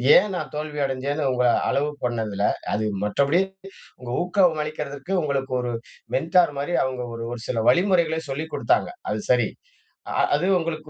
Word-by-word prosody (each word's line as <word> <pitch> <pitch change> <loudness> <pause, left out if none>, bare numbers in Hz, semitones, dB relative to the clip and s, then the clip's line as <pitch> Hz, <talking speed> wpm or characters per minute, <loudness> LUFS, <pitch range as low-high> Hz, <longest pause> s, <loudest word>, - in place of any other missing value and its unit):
ஏன் 210 +3 +5
நான் - - -4
தோல்வி 150 0 -4
அடைஞ்சேன்னு 135 +2 -1
உங்கள 125 0 +2 0.2
அளவு 145 +2 +1 0.2
பண்ணதுல, 110 -4 -1 0.3
அது 110 +1 0 0.2
மற்றபடி 140 - +2 0.6
உங்க 125 -1 -8
ஊக்கம் 180 -3 +3
அளிக்கதற்கு 150 +2 -5
உங்களுக்கு 135 -3 -1
ஒரு 120 -1 -2 0.4
மெண்டார் 165 +2 +3
மாரி 160 +5 -1
அவங்க 130 -1 -3
ஒரு 115 0 -5 0.2
சில 115 - -2
வழிமுறைகளை 170 -3 +3
சொல்லிக் 155 +4 -4
குடுத்தாங்க. 350 +2 +2 0.2
அது - - -1
சரி. - - +3 0.6
அ - - -2 0.2
அது 150 +5 0
உங்களுக்கு 155 -2 -4
145 Hz, 150 wpm, -24 LUFS, 130-165 Hz, 0.6 s, ஏன்